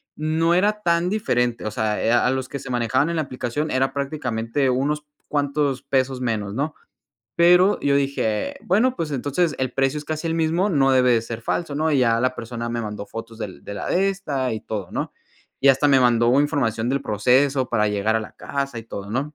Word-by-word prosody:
no 160 +2 +1
era 210 +3 +2
tan 170 0 +2
diferente, 125 - 0
o 110 - -2
sea, 105 -1 -1
eh, 115 - +2
a 120 +1 +3
los 130 0 -2
que 140 - -5
se 135 - -9
manejaban 125 +5 +1
en 170 - -2
la 160 - +1
aplicación 130 +3 -3
era 130 +1 +1
prácticamente 135 -2 -1
unos 145 +4 0 0.2
cuantos 145 -2 -1
pesos 130 -2 0
menos, 110 -5 -2
¿no? 150 +4 -1 0.6
Pero, 180 +3 +5
yo 140 0 +2
dije: 135 -6 -1
"Bueno, 225 +8 +2
pues, 160 -2 -3
entonces 145 +5 0
el 130 -1 -1
precio 135 +2 +1
es 150 - -8
casi 155 +2 -4
el 165 - 0
mismo, 165 +4 +1
no 135 -5 +3
debe 125 -1 +4
de 115 -1 +2
ser 115 0 -6
falso", 150 +5 -2
¿no? 155 +2 +1
Y 145 - +2
ya 115 -2 +3
la 130 +1 +1
persona 120 0 -5
me 120 0 -2
mandó 105 -1 -6
fotos 115 +1 -8
del 100 -5 -7
de 100 - -6
la - - -5
de 195 +2 +2
esta, 140 -10 -2
y 110 - -3
todo, 100 -5 -5
¿no? - - -3 0.5
Y 140 - +4
hasta 135 +2 +4
me 135 -2 +5
mandó 120 +1 +4
información 120 -6 0
del 140 +1 0
proceso 130 +5 +2
para 105 -3 +2
llegar 105 +2 0
a - - 0
la 110 - -9
casa 140 -3 -4
y - - -7
todo, 100 -3 -7
¿no? 140 +6 -2
135 Hz, 215 wpm, -22 LUFS, 115-150 Hz, 0.6 s, Pero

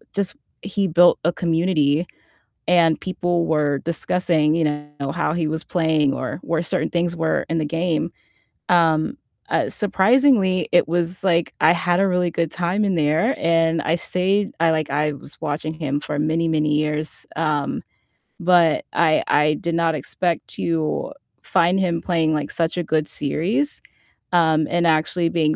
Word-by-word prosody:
just 200 -2 -1 0.3
he 200 -1 -1
built 175 +1 +4
a 170 - +3
community 165 -2 +1 0.6
and 165 -3 +3
people 175 -2 -1
were 145 -3 +1
discussing, 165 -1 0
you 165 -1 +1
know, 150 -2 -4
how - - -1
he 165 -2 -1
was 160 +1 -3
playing 160 -5 +1
or 130 - -4
where 165 0 -1
certain 165 - -1
things 170 0 -1
were 160 -1 -1
in 165 0 0
the 155 - -1
game, 165 +1 -1 0.6
um, 165 - +2 0.3
uh, - - +1
surprisingly, 205 -2 +3
it 175 - +4
was, 175 +2 0
like, 170 -3 +1
I 160 - +6
had 175 0 0
a 195 - +3
really 180 -1 0
good 165 -1 -2
time 180 +4 -1
in 195 -2 0
there, 160 - +1
and 165 -1 +1
I 165 - +1
stayed 195 +4 0
I, 165 0 +4
like 155 -2 -1
I 150 0 0
was 140 +1 -13
watching 155 0 -3
him 145 -3 -2
for 150 0 -5
many, 160 +2 0
many 150 -2 +1
years. 150 0 -3
Um, 155 -3 -1 0.6
but 170 -2 +3
I 160 -2 +3
I 150 +1 +3
did 170 +2 -3
not 165 -1 +1
expect 170 +4 -2
to 165 - -2 0.3
find 175 +3 +2
him 170 -3 0
playing, 165 -3 0
like, 150 -1 -2
such 165 -1 0
a 175 - -1
good 155 -1 0
series, 200 - 0 0.5
um, 160 -3 +3
and 170 0 +1
actually 165 +2 +1
being 155 -2 +1
165 Hz, 165 wpm, -21 LUFS, 155-175 Hz, 0.6 s, I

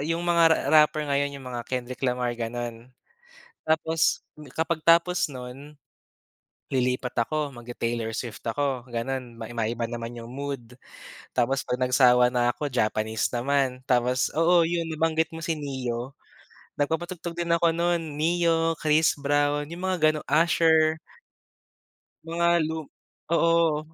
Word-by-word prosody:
yung 165 +4 -2
mga 170 -1 +3
ra 160 - +4 0.2
rapper 150 0 +1
ngayon 140 0 +1
yung 135 - -11
mga 125 -1 -5
Kendrick 125 0 -4
Lamar 125 -2 0
gano'n. 120 0 -5 0.7
Tapos 160 0 +1 0.2
kapag 160 0 -2
tapos 170 0 +3
nun, 135 +3 -10 0.9
lilipat 125 -1 0
ako, 150 +4 -1
mag-te-Taylor 115 -2 -4
Swift 115 -3 -5
ako 130 0 -2
gano'n, 120 0 -4
mai 115 0 -8
maiba 115 0 -2
naman 115 0 -5
yung 115 +1 -9
mood. 135 -3 -6 0.6
Tapos 135 +3 +2
'pag 125 - -2
nagsawa 125 -1 +4
na 120 -1 +2
ako 145 -3 -4
Japanese 110 -1 0
naman, 130 +1 -1
tapos 125 -1 +1
oo 170 +1 +4
yun 170 0 -1
nabanggit 160 0 0
mo 165 - -6
si 160 -2 -2
Neyo, 130 -2 -4 0.6
nagpapatugtog 170 +3 -3
din 170 -1 +1
ako 170 0 +3
nun 165 -3 -1
Ne-yo, 165 0 +2
Chris 155 +1 +3
Brown, 145 +1 0
yung 180 +3 -5
mga 185 - +1
ganu 155 0 -3
Usher. 160 0 +3 1.3
Mga 170 +1 +2
lum 160 -1 -4 0.5
oo 165 -2 +3
145 Hz, 135 wpm, -26 LUFS, 125-165 Hz, 1.3 s, ra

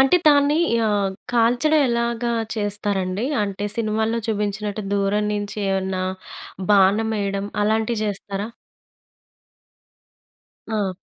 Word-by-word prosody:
అంటే 270 +7 +6
తాన్ని 290 0 +5 0.3
ఆహ్, 200 -2 +1 0.2
కాల్చడం 245 +7 +3
ఎలాగా 235 0 0 0.2
చేస్తారండి? 205 -1 -1 0.2
అంటే 200 0 -3
సినిమాల్లో 220 +1 0
చూబించినట్టు 210 0 -2
దూరం 200 +1 +1
నుంచి 205 0 -4
ఏమన్నా 190 -1 -1 0.7
బాణం 205 +3 +4
ఎయడం 200 0 -2 0.2
అలాంటియి 220 +1 +1
జేస్తారా? 205 0 -3 2.2
ఆ! 210 -4 -1
210 Hz, 90 wpm, -22 LUFS, 200-230 Hz, 2.2 s, అంటే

